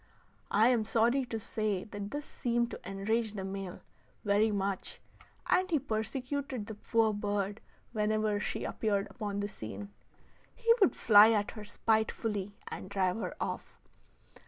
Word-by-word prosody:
I 220 +4 +5
am 240 -3 +3
sorry 235 +4 +2
to 225 -2 -4
say 210 -3 -1
that 205 -1 -6
this 290 +3 -4
seemed 235 -1 -1
to - - -6
enrage 215 +3 0
the 195 - -3
male, 195 -1 -5 0.4
very 205 +2 +4
much, 200 -2 -2 0.5
and 370 +1 +3
he 325 - +3
persecuted 255 0 -3
the 220 - -6
poor 220 +1 +2
bird 205 0 -2 0.3
whenever 215 -1 +1
she - - -3
appeared 200 -3 0
upon 205 -4 -3
the 205 - -1
scene. 105 - -7 0.7
He 465 -1 +5
would 325 - +5
fly 215 +1 +8
at 205 -1 +1
her 215 - -8
spitefully 210 -2 0
and 185 - -6
drive 190 -1 +1
her - - -4
off. - - -4
215 Hz, 150 wpm, -32 LUFS, 200-230 Hz, 0.7 s, fly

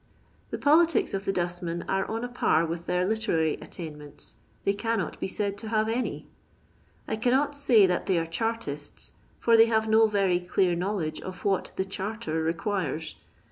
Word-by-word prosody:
The - - -3
politics 320 +3 +4
of 195 +1 -2
the - - +1
dostmen 175 -1 -2
are 195 0 +1
on 225 +2 -2
a - - -1
par 170 -9 +2
with 170 +1 -5
their 180 0 +1
literary 195 -7 +1
attainments 150 -4 -9
— - - -35
they 200 - +3
cannot 225 -1 -2
be - - -2
said 200 0 -2
to 225 - -6
haTe 220 +1 +1
any. 250 - -3 0.8
I 220 - -1
cannot 265 +6 +1
say 250 -8 +5
that 180 -1 0
they 185 - +3
are 165 - +1
ChartisU, 165 -5 -3 0.3
for 230 - +4
they 225 0 +7
have 220 -1 +1
no 220 +1 +5
very 195 -4 +2
dear 180 0 +1
know 190 +5 -1
ledge 155 -5 -3
of 185 0 -8
what 195 -2 +1
"the 190 - -1
charter" 195 -4 -3
requires. 165 -2 -2
195 Hz, 180 wpm, -27 LUFS, 170-225 Hz, 0.8 s, they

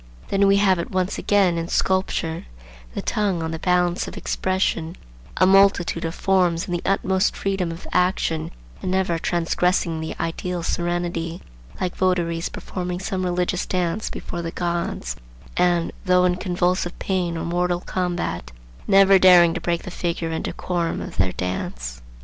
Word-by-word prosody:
Then 200 0 +3
we 195 0 +5
have 190 -3 +3
it 170 - -3
once 185 0 -1
again 190 -5 +3
in 165 - -3
sculpture, 175 - 0 0.5
the - - -3
"tongue 195 -6 0
on 160 - -3
the 160 - -4
balance 180 0 +1
of - - -8
expression," 185 -3 -1 0.4
a 185 - +5
multitude 190 -3 +4
of 165 - -3
forms 180 -3 +2
in 190 - -7
the 175 - -1
utmost 190 0 +1
freedom 195 -3 -1
of 165 +2 -8
action 170 -3 +1 0.3
and - - -3
never 185 -3 +1
transgressing 170 -1 0
the 160 - -4
ideal 170 +1 -3
serenity; 175 -1 -2 0.4
like 180 -1 -2
votaries 175 -2 0
performing 180 -1 -5
some 190 0 -2
religious 180 0 -1
dance 180 +3 -1
before 175 - -5
the 165 - -3
gods, 170 - -3 0.4
and, 175 -2 +2
though 180 0 +4
in 180 0 +2
convulsive 180 -1 0
pain 180 -3 -1
or 165 - -3
mortal 175 +1 0
combat, 175 - -3 0.4
never 195 -1 +6
daring 175 -2 +7
to 170 - -4
break 170 0 -1
the 185 - -7
figure 170 -2 -2
and 160 - -3
decorum 175 -2 -2
of - - -7
their 95 -1 +2
dance. - - -4
175 Hz, 160 wpm, -23 LUFS, 165-185 Hz, 0.5 s, daring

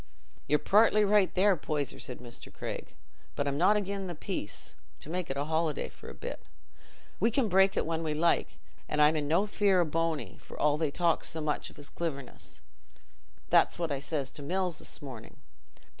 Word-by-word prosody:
"Ye're 150 - +4
partly 210 +4 +4
right 205 -2 +4
there, 195 +1 +5
Poyser," 150 -3 -3
said 125 - -7
Mr. 120 -1 -9
Craig, - - -6 0.4
"but 145 - -1
I'm 140 +1 -1
not 205 +5 +5
again' 200 -1 -2
the 175 - -5
peace—to 150 - -7
make 180 0 -2
a 140 +1 -1
holiday 160 -1 0
for - - -12
a - - -9
bit. - - -6 0.8
We 225 - +4
can 240 0 +2
break 195 0 +4
it - - +2
when 165 0 -1
we 155 -2 -1
like, 170 +2 +1 0.3
an' 150 - -1
I'm 150 +1 +6
in 150 -2 -1
no 170 +7 +3
fear 200 -2 +3
o' 175 - +4
Bony, 165 0 -1
for - - -11
all 150 0 +3
they 160 -2 +1
talk 170 +2 +1
so 160 - -2
much 150 -2 -2
o' - - -17
his 145 -1 -7
cliverness. 140 -7 -6 0.9
That's - - +5
what 170 -3 -2
I 140 - -1
says 140 -1 -3
to - - -9
Mills 180 +2 -1
this - - -4
morning. 130 -6 -9
160 Hz, 190 wpm, -30 LUFS, 145-190 Hz, 0.9 s, I'm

